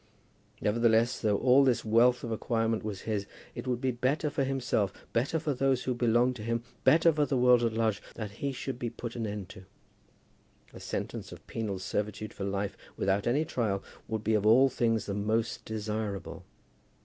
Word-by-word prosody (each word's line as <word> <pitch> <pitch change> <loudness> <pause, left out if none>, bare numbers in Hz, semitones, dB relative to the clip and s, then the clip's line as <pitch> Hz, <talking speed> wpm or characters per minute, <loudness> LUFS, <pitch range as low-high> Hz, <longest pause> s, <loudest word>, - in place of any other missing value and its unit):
Nevertheless, 115 +2 +3
though 105 -3 +2
all 130 +4 +5
this 130 -4 +2
wealth 120 +3 +4
of 115 - -4
acquirement 115 0 0
was 105 -3 -4
his, 105 -3 -2 0.3
it - - -7
would 125 -2 0
be 130 0 0
better 135 +5 0
for 140 - 0
himself, 130 -7 0 0.2
better 130 +7 +1
for 155 -2 -1
those 135 -1 +1
who 130 - 0
belonged 120 +1 +2
to - - -8
him, 115 +1 -1 0.2
better 165 +1 +5
for 150 -1 +1
the 135 - 0
world 125 -1 +5
at 115 -1 +1
large, 110 -2 0
that 110 -3 -5
he 140 - 0
should 130 -1 -5
be 120 - -2
put 120 0 -7
an 115 -2 -2
end 100 -3 -5
to. 95 -2 -12 1.1
A - - -10
sentence - - -5
of - - -12
penal 105 -4 -3
servitude 105 +2 -3
for 100 - -5
life, 100 0 -2 0.2
without 100 +2 +1
any 140 +6 +2
trial, 105 -9 -1 0.2
would 110 -1 -3
be 110 - +1
of 105 -2 +2
all 125 +6 +6
things 115 -4 0
the 100 - -3
most 110 +3 -1
desirable. 105 -2 -4
115 Hz, 190 wpm, -30 LUFS, 105-125 Hz, 1.1 s, all